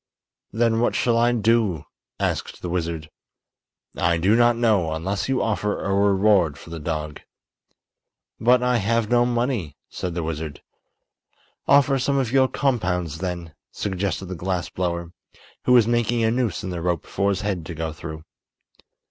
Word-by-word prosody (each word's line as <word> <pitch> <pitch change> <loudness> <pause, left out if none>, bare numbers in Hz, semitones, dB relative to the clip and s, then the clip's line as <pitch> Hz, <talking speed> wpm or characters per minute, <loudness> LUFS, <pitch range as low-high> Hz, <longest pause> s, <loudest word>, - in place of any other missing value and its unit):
"Then 115 +1 +2
what 120 - +1
shall 120 -2 +2
I 120 +1 +3
do?" 110 -8 +1 0.3
asked - - -2
the 90 - -3
wizard. 85 -3 -3 0.8
"I 85 - +2
do 95 +6 +3
not 120 0 +4
know, 105 -9 +2
unless 95 +9 -2
you 135 - +1
offer 105 -1 -1
a 100 - -1
reward 100 -5 +3
for 85 - -12
the 85 - -5
dog." 75 -1 -4 1.2
"But 125 +2 +4
I 125 -1 +2
have 115 +1 0
no 120 0 +4
money," 120 - -1
said 90 -2 -4
the 85 - -2
wizard. 80 -2 -5 1.0
"Offer 140 -1 +4
some 140 +2 +1
of 130 -4 0
your 135 0 +4
compounds, 90 - -1
then," 85 -3 -4 0.2
suggested 95 -1 -2
the 95 - -6
glass 90 0 -2
blower, 85 -2 -3 0.5
who 125 - +4
was 120 -3 +6
making 120 0 +1
a 110 - +3
noose 120 -6 -1
in 95 - -4
the 85 -1 -4
rope 85 -2 -1
for 100 - 0
his 100 -1 -1
head 100 -5 -2
to 85 - -6
go 80 0 -3
through. 80 -1 -8
100 Hz, 165 wpm, -23 LUFS, 85-120 Hz, 1.2 s, was